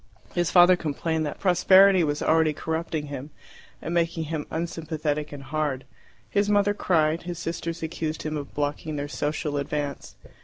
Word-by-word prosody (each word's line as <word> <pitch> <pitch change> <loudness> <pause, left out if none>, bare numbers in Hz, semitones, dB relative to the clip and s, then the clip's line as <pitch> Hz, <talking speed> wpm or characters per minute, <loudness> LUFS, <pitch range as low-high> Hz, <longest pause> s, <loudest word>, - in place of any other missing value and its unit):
His 175 -2 +1
father 180 0 +7
complained 160 0 -2
that 145 - -6
prosperity 190 0 +6
was 145 -1 -1
already 160 -1 +3
corrupting 160 0 -3
him 140 0 -7 0.5
and 165 - -3
making 165 -1 0
him 155 -1 -4
unsympathetic 155 -2 -3
and 140 -1 -8
hard; 145 -3 -2 0.4
his 205 0 +1
mother 205 0 +3
cried; 160 -5 +1
his 175 - -4
sisters 165 0 -4
accused 160 -1 -3
him 155 0 -3
of 145 -2 -6
blocking 150 +1 -2
their 145 0 -3
social 145 0 -2
advance. 145 0 -4
160 Hz, 155 wpm, -25 LUFS, 150-170 Hz, 0.5 s, father